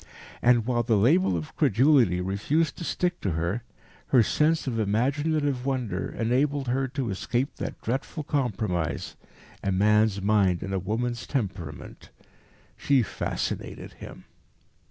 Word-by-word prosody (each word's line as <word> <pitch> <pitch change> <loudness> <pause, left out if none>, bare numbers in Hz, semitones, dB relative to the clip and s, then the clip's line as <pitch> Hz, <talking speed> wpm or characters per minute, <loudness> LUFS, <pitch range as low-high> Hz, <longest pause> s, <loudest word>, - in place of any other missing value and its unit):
And, 120 -2 +4
while 120 -1 +1
the 115 -2 +2
label 130 - +3
of 80 -2 -7
credulity 120 - +4
refused 140 - 0
to - - -6
stick 175 +1 -1
to 95 - -1
her, 85 +8 -1 0.5
her 125 -4 +5
sense 155 +8 +1
of 120 -4 -2
imaginative 135 +6 0
wonder 125 -8 -2
enabled 135 +3 +1
her 135 +2 +1
to 130 -4 -3
escape 120 +7 -2
that - - -5
dreadful 135 +6 -3
compromise, 110 - -2 0.5
a 100 - 0
man's 105 +1 +3
mind 100 -3 +2
in 95 0 -4
a 95 - 0
woman's 120 +5 -2
temperament. 95 - -5 0.7
She 135 -3 +2
fascinated - - -4
him. - - -11
120 Hz, 135 wpm, -26 LUFS, 100-135 Hz, 0.7 s, her